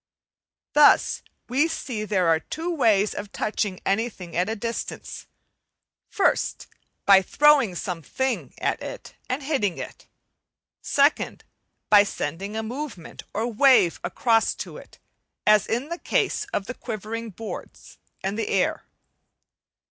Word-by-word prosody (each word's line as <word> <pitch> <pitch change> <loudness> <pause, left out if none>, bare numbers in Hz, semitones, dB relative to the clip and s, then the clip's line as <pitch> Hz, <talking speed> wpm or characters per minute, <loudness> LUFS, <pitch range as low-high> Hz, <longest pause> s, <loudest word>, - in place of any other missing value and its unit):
Thus 295 0 +5 0.3
we 275 +6 +2
see 245 -9 -4
there 190 -4 +1
are 165 -1 +4
two 330 - -4
ways 215 -9 +3
of 205 0 -6
touching 205 -3 -2
anything 195 -4 -2
at 180 +4 +1
a 225 - -1
distance; 230 +2 -5 0.8
1st, 400 - +1 0.4
by 195 -1 +8
throwing 275 -2 +4
some 175 -1 -4
thing 265 - -3
at - - -1
it - - -8 0.2
and 265 +3 -2
hitting 260 - 0
it; - - -8 0.8
2nd, 285 +1 +2 0.5
by 205 -1 +9
sending 195 +1 -4
a 220 - -2
movement 240 - -6
of 225 +1 -2
wave 260 -11 +5
across 225 -2 +2
to - - -7
it, - - -14 0.5
as 210 -1 +5
in 245 +6 -2
the 340 +1 -4
case 425 - 0
of 365 - -3
the 250 - -5
quivering 225 -1 -5
boards 220 +2 -9 0.2
and 195 +3 -2
the - - -1
air. - - 0
220 Hz, 135 wpm, -25 LUFS, 195-270 Hz, 0.8 s, by